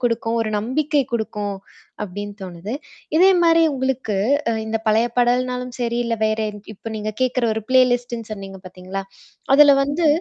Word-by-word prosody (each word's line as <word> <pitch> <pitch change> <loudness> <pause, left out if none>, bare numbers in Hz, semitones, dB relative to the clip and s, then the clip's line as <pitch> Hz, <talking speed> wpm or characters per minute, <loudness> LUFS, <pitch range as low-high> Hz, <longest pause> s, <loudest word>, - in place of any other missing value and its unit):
குடுக்கும், 230 -1 0
ஒரு 215 - -3
நம்பிக்கை 285 +6 0
குடுக்கும், 210 -3 -3 0.5
அப்படின்னு 205 +1 -6
தோணுது. 185 +5 -6 0.4
இதே 370 +4 +7
மாரி 330 0 +5
உங்களுக்கு 260 -5 -2 0.4
அ - - +1
இந்த 220 0 -1
பழைய 220 +2 +3
பாடல்னாலும் 250 +1 +1
சரி, 235 0 -1
இல்ல 235 - 0
வேற 215 0 0 0.4
இப்ப 225 +3 -8
நீங்க 215 0 -3
கேக்கற 255 -1 +1
ஒரு 220 - -3
ப்ளேலிஸ்ட்ட்ன்னு 245 -3 +2
சொன்னீங்க 195 -2 -8
பார்த்தீங்களா? 185 +2 -6 0.5
அதுல 290 0 +8
வந்து 295 +4 0
235 Hz, 145 wpm, -21 LUFS, 210-255 Hz, 0.5 s, அதுல